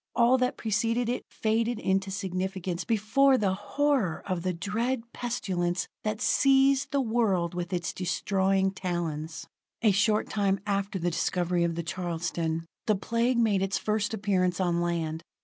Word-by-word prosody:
All 245 +2 +4
that 255 +1 0
preceded 230 +2 0
it 250 - -3
faded 225 +2 0
into 195 -2 0
significance 190 -2 -3
before 255 +5 +3
the 195 -5 +1
horror 265 - 0
of 185 -3 -2
the 185 +1 0
dread 225 +8 -2
pestilence 185 -7 -2 0.2
that 215 0 -2
seized 270 +2 +3
the 280 - 0
world 220 -9 +1
with 175 0 -4
its 175 -2 -2
destroying 190 +1 +1
talons. 170 -4 -4 0.4
A 215 - +6
short 210 +2 +2
time 195 -2 +1
after 200 0 -1
the 175 -1 -1
discovery 175 +1 0
of 170 -1 0
the 170 - -3
Charleston, 165 -1 -2 0.2
the 215 - +4
Plague 235 +5 0
made 215 -5 +3
its 195 0 0
first 210 -1 -1
appearance 195 -4 0
on 175 -2 +1
land. 165 -2 -1
195 Hz, 150 wpm, -28 LUFS, 175-230 Hz, 0.4 s, A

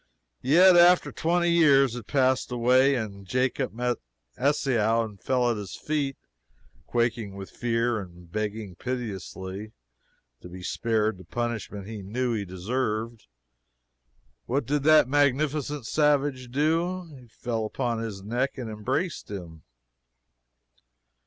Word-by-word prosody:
Yet 180 +6 +6
after 175 +1 +6
twenty 175 +1 +1
years 140 -7 +5
had 120 -4 -7
passed 130 -2 +2
away 130 +3 +4
and 100 -5 -5
Jacob 125 +3 0
met 120 +2 -1 0.4
Esau 120 -5 +2
and 105 -4 -11
fell 125 +3 +2
at 115 - -2
his 100 -3 -6
feet 145 -3 -2 0.7
quaking 115 -4 -1
with 95 -1 -8
fear 115 -1 0
and 90 -3 -11
begging 105 -1 -3
piteously 100 -3 -5 0.7
to 90 - -10
be 90 +1 -9
spared 110 -1 0
the - - -11
punishment 110 -1 -4
he 110 0 -7
knew 120 +5 -1
he 105 -3 -2
deserved, 110 +4 -3 1.2
what 135 +1 0
did 145 +3 0
that 155 -3 +6
magnificent 145 0 +1
savage 145 -3 +1
do? 165 +7 0 0.2
He 125 - -17
fell 115 0 -3
upon 115 +1 -2
his 105 -4 -5
neck 120 +7 -1
and 120 -4 -5
embraced 130 - -2
him! 85 -6 -8
120 Hz, 125 wpm, -26 LUFS, 105-140 Hz, 1.2 s, Yet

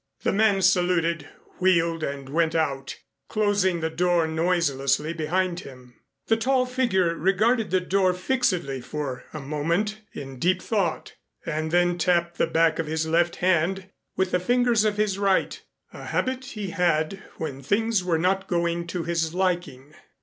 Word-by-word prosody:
The - - +2
man 200 -2 +3
saluted, 175 -4 +2 0.3
wheeled 170 -3 +2
and 140 -2 -4
went 160 +3 0
out, 140 -4 -1 0.3
closing 205 -5 +1
the 160 - 0
door 175 0 +2
noiselessly 160 -3 0
behind 175 +2 -1
him. 125 -6 -12 0.3
The 225 - +2
tall 255 +2 +2
figure 235 -9 +1
regarded 210 +7 +1
the 185 0 +2
door 185 0 +2
fixedly 180 - -1
for 135 -2 -5
a 155 - -6
moment 165 +10 -1
in 135 -2 -8
deep 180 +4 +2
thought, 190 -6 -2 0.3
and 155 -1 -2
then 175 +1 +2
tapped 170 0 +1
the - - +3
back 165 0 +2
of 165 - -1
his 160 +1 -1
left 170 +2 +1
hand 185 +2 0 0.3
with 190 -1 +1
the 180 - +2
fingers 240 +2 +2
of 210 -1 0
his 205 -2 0
right, 195 -2 +1 0.3
a - - -9
habit 260 0 -2
he 210 -8 -6
had 175 0 0 0.2
when 140 -4 -5
things 210 - +1
were 175 -3 +1
not 190 +3 0
going 170 -1 -1
to 175 0 -3
his 165 -1 -1
liking. 175 -7 -2
175 Hz, 155 wpm, -25 LUFS, 160-195 Hz, 0.3 s, man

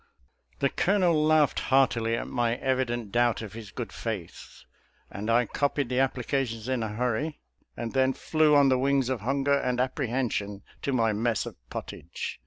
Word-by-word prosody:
The 140 - +3
Colonel 185 -3 +2
laughed 155 -2 +3
heartily 120 -4 +3
at - - -3
my 120 -2 0
evident 120 -4 -1
doubt 120 0 +2
of 105 - -8
his 110 -2 -9
good 120 +2 -6
faith, 105 -8 -6 0.5
and 105 +3 -5
I 120 +1 +4
copied 140 +2 -1
the 125 - -1
appli 130 -2 0
cation 130 -3 -1
in 125 - -1
a 110 - -1
hurry, 125 +6 -1 0.4
and 115 -1 -4
then 130 0 +3
flew 155 0 +2
on 140 -1 +6
the 130 -1 +3
wings 135 -1 +2
of 130 -5 -2
hunger 135 +4 +1
and 125 -2 -1
apprehension, 120 -7 -1 0.2
to 140 - -1
my 115 -4 +2
mess 110 +1 0
of - - -7
pottage. - - -6
125 Hz, 175 wpm, -27 LUFS, 115-135 Hz, 0.5 s, on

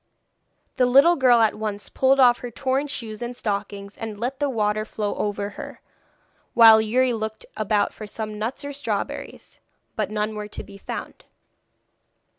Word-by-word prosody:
The 250 - +4
little 275 +8 +6
girl 250 -5 +5
at 220 - +3
once 210 -1 -4
pulled 270 +1 +2
off 245 -2 +6
her 245 - -6
torn 265 +4 -1
shoes 225 -6 -6
and 240 +1 -5
stockings 200 -2 -4
and 220 -2 -7
let 255 +4 -3
the 290 -1 +1
water 215 -3 0
flow 210 -1 -3
over 205 0 -3
her, - - -9 0.8
while 225 -2 +9
Youri 245 +3 +2
looked 220 -1 -5
about 210 -1 0
for 215 - -9
some 215 0 -5
nuts 240 +6 -4
or 285 - -5
strawberries. 285 - -5 0.4
But 210 -3 -1
none 215 0 -2
were 210 -1 -5
to 210 - -8
be 200 - -13
found. - - -7
220 Hz, 165 wpm, -23 LUFS, 210-250 Hz, 0.8 s, while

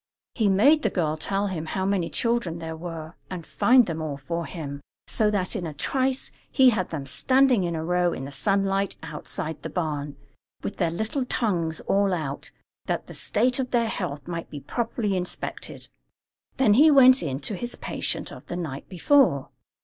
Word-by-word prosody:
He 220 -4 +2
made 275 +11 +5
the - - +1
girl 155 -4 0
tell 195 +5 -1
him 170 -5 -3
how 190 +3 -2
many 190 -4 0
children 230 -8 0
there 160 -1 -5
were, 165 -1 -7 0.2
and 180 -3 -6
find 250 0 +5
them 165 -3 -4
all 150 -3 -3
for 170 +3 -4
him, 140 -3 -6 0.2
so 215 -1 +1
that 200 0 -1
in 180 -5 -2
a 155 - -7
trice 260 - 0 0.2
he 260 -2 +6
had 190 -5 -1
them 150 -4 -4
standing 255 - +3
in 170 -1 -1
a 160 0 -3
row 180 0 +2
in 135 - -5
the 140 - -7
sunlight 195 +5 0
outside 155 0 -4
the 160 - -5
barn, 150 -4 -3 0.5
with 205 - -4
their 170 -3 +1
little 220 - -2
tongues 170 -10 -1
all 195 -1 +2
out, 145 -4 -4 0.4
that - - -1
the - - -10
state 250 +1 0
of 255 -1 -1
their 235 -2 +1
health 150 -9 -4
might 170 -1 -5
be 145 - -7
properly 225 - -2
inspected. 180 -1 -5 0.7
Then 260 -6 +5
he 295 +8 +7
went 260 -2 +7
in 135 -4 -2
to - - -2
his 240 +5 -5
patient - - -3
of - - -11
the - - -4
night 150 -6 -5
before. 185 - +3
180 Hz, 190 wpm, -25 LUFS, 160-230 Hz, 0.7 s, he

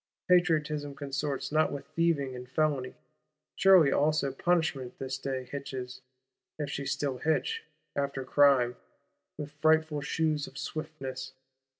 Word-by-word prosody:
Patriotism 155 -5 +2
consorts 140 0 -3
not 155 +1 +3
with 140 -1 -5
thieving 155 -5 +1
and 125 0 -9
felony: 140 -3 0 0.6
surely 185 -7 +6
also 145 -1 +2
Punishment, 145 -4 0
this 130 0 -3
day, 135 -1 -3
hitches 130 -1 -6 0.6
(if 145 -2 -3
she 140 0 -3
still 135 -3 -1
hitch) 450 - 0 0.3
after 140 -1 -1
Crime, 130 -3 +4 0.6
with 150 -1 -6
frightful 155 0 +2
shoes 155 0 0
of - - -12
swiftness! 135 -4 -5
145 Hz, 120 wpm, -30 LUFS, 135-155 Hz, 0.6 s, surely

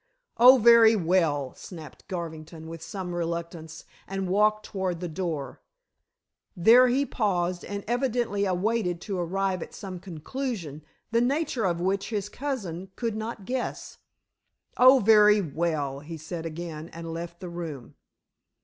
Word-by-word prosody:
"Oh, 255 +3 +9
very 230 -1 +7
well," 165 -7 +1
snapped 160 -6 -11
Garvington, 160 -2 -6
with 165 0 -8
some 180 +2 -6
reluctance, 170 -1 -5 0.2
and 195 -1 -3
walked 215 +3 +2
toward 185 -4 -3
the 180 - -4
door. 160 -6 -4 1.0
There 235 +8 +7
he 265 +3 +2
paused, 180 -7 -1
and 200 0 -5
evidently 240 -4 0
awaited 185 -1 0
to 195 -4 -4
arrive 185 +1 -1
at - - -8
some 190 -3 -7
conclusion, 175 - -5 0.3
the 230 0 +3
nature 265 -3 0
of 170 -2 0
which 195 +2 -1
his 210 -3 -3
cousin 195 - -5
could 230 -3 -2
not 220 -2 -5
guess. 255 +2 -4 0.8
"Oh, 255 +2 +7
very 210 -2 +6
well," 155 -5 -2
he 160 +3 -8
said 165 +1 -6
again, 165 0 -7
and 165 0 -7
left 170 +1 -7
the 180 - -7
room. 165 -7 -7
185 Hz, 140 wpm, -27 LUFS, 165-215 Hz, 1.0 s, Oh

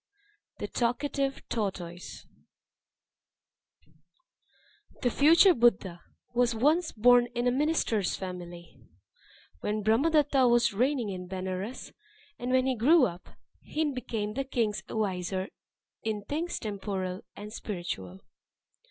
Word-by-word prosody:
The - - -4
Talkative 270 +3 -1
Tortoise 180 -5 -4 2.8
The 245 - +2
future 335 - +6
Buddha 195 - +2 0.3
was 240 -1 +2
once 310 +8 +2
born 245 +2 +5
in 240 +1 0
a 245 - +3
minister's 260 - +1
family, 175 -5 -8 0.8
when 210 - -2
Brahma 225 +10 +3
datta 290 -4 +3
was 235 -2 +3
reigning 250 +1 +1
in 180 -2 -6
Benares; 190 +5 -5 0.5
and 245 - -4
when 255 0 +3
he 265 - +2
grew 275 +6 +5
up, 175 -4 -6 0.3
he 305 -2 -2
became 220 -4 -3
the 275 - -2
king's 230 -6 -1
adviser 190 -2 -2 0.5
in 215 -2 -3
things 320 +9 -3
temporal 195 -3 -4
and 210 +1 -9
spiritual. 135 - -5
225 Hz, 110 wpm, -29 LUFS, 190-260 Hz, 2.8 s, future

